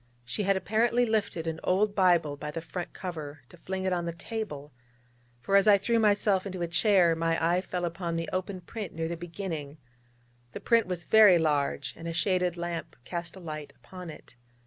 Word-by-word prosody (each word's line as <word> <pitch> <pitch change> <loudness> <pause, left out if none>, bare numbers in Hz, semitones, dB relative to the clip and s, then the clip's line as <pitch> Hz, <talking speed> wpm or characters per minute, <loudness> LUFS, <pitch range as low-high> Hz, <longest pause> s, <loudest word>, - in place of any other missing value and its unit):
She 125 - -3
had 195 -1 +2
apparently 235 +5 +2
lifted 205 -7 -1
an 160 0 -3
old 200 +3 +2
Bible 175 -7 +3
by 150 +1 -6
the 160 +2 -4
front 175 +2 -6
cover 155 -5 -7
to 175 - -15
fling 190 +2 -4
it 190 -1 +1
on 175 -1 -1
the 170 - -2
table, 165 - -6 0.7
for 195 +10 0
as 200 +1 +5
I 205 -1 +8
threw 230 +4 +1
myself 205 -3 +3
into 185 -3 -4
a - - -1
chair 175 -1 +4
my 165 0 0
eye 170 +2 +2
fell 180 -1 -3
upon 170 0 -3
the 165 -1 -2
open 185 0 -3
print 205 -1 -7
near 165 0 -2
the 170 - -3
beginning. 165 -4 -6 0.8
The - - -5
print 230 -3 +3
was 180 -2 -3
very 210 -2 +7
large, 145 -3 0
and 165 - -8
a 165 - -3
shaded 180 0 +1
lamp 170 -1 -4
cast 170 -1 -5
a - - -10
light 155 -4 -7
upon 180 -2 -10
it. 155 - -12
175 Hz, 200 wpm, -28 LUFS, 165-195 Hz, 0.8 s, I